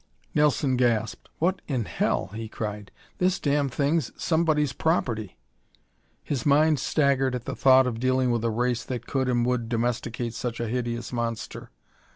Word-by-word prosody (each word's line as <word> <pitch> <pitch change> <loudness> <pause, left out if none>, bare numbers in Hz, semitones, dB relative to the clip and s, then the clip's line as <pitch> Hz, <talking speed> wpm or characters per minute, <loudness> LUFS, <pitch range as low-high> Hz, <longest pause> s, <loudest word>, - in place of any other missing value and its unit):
Nelson 145 -3 +2
gasped. 115 -3 0
"What 180 +3 0
in 125 -7 -1
hell!" - - -1
he 110 0 -6
cried. 105 -2 -5 0.3
"This 180 +1 +2
damn 145 -1 +1
thing's 145 +3 0
somebody's 155 -4 +1
property!" 115 - -1 0.9
His 135 -6 -2
mind, 150 +1 +4
staggered 135 -2 +2
at 125 - -5
the - - -4
thought 130 0 +6
of 120 -3 -2
dealing 130 0 +2
with 115 -1 0
a 115 - +1
race 120 +1 0
that 125 -2 -5
could 130 -2 -1
and 120 -1 +2
would 120 -2 -1
domesticate 120 0 -2
such 120 -1 -4
a 120 - -2
hideous 120 0 -3
monster. 115 -2 -4
125 Hz, 160 wpm, -26 LUFS, 115-140 Hz, 0.9 s, thought